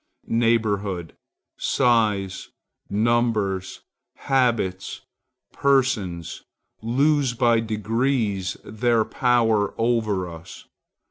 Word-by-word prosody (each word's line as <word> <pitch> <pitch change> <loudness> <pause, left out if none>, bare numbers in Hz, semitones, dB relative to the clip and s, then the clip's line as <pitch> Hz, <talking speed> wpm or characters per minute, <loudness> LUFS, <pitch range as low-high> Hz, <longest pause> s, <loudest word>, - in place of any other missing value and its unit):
Neighborhood, 105 -6 0 0.4
size, 105 -6 +1 0.4
numbers, 105 -3 0 0.3
habits, 115 -8 0 0.5
persons, 115 - 0 0.4
lose 135 +2 +1
by 120 -2 +3
degrees 110 -3 -1
their 110 +1 +1
power 115 -5 +1
over 110 -5 0
us. 85 +1 -11
110 Hz, 65 wpm, -23 LUFS, 100-120 Hz, 0.5 s, by